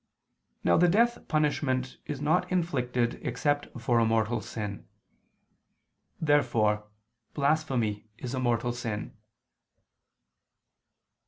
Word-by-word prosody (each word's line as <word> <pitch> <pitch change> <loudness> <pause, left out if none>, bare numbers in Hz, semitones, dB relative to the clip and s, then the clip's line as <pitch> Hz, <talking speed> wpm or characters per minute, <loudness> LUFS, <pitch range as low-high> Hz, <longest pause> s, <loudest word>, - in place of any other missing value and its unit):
Now 85 - +4
the 175 - +5
death 235 +7 +2
punishment 140 -4 0
is 145 -3 -4
not 160 +6 +1
inflicted 125 -9 0
except 145 -1 0
for 115 0 +2
a - - +4
mortal 115 +1 +1
sin. 105 -3 -6 1.3
Therefore 110 -9 +2 0.5
blasphemy 135 -8 0
is 125 +1 -5
a 130 - -1
mortal 120 -1 +1
sin. 115 -4 -4
125 Hz, 95 wpm, -28 LUFS, 115-150 Hz, 1.3 s, the